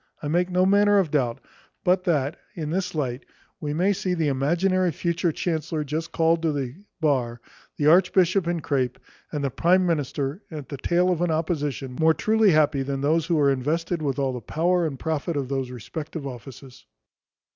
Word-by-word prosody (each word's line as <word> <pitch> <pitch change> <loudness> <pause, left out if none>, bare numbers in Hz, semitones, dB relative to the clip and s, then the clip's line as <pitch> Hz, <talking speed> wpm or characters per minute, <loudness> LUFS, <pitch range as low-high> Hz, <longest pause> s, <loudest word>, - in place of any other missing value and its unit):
I - - -2
make 175 +3 +1
no 180 0 +2
manner 205 +1 +4
of 185 -7 +2
doubt 125 -6 0 0.4
but 185 0 +2
that, 150 -5 +1 0.2
in 155 -3 -4
this 180 -1 -2
light, 130 -4 -2 0.4
we 150 - -3
may 180 +7 +2
see 185 -2 -2
the 160 -3 +1
imaginary 175 +7 +1
future 170 +2 -1
chancellor 160 -1 -2
just 155 +3 -4
called 165 0 +2
to 165 -2 +1
the 135 -4 -3 0.3
bar, 125 -6 +1 0.4
the 145 - 0
archbishop 180 +2 +4
in 170 -1 -1
crape, 130 -5 -1 0.3
and 150 -2 -3
the 140 - -1
prime 180 +7 +3
minister 145 0 -1
at 150 -5 -8
the 140 - -5
tail 175 +6 +2
of 175 -2 -1
an 175 - +1
opposition, 150 -5 -2
more 160 0 +4
truly 220 -1 +3
happy 150 -4 +3
than 135 0 -3
those 155 +3 +1
who 170 - +2
are 140 -2 +4
invested 160 +6 -1
with 140 -3 -1
all 135 -2 0
the 125 - -5
power 170 - +1
and 140 -3 -5
profit 160 +2 -2
of 135 -2 -3
those 135 -2 -2
respective 150 +6 -7
offices. 130 0 -10
155 Hz, 190 wpm, -24 LUFS, 140-175 Hz, 0.4 s, manner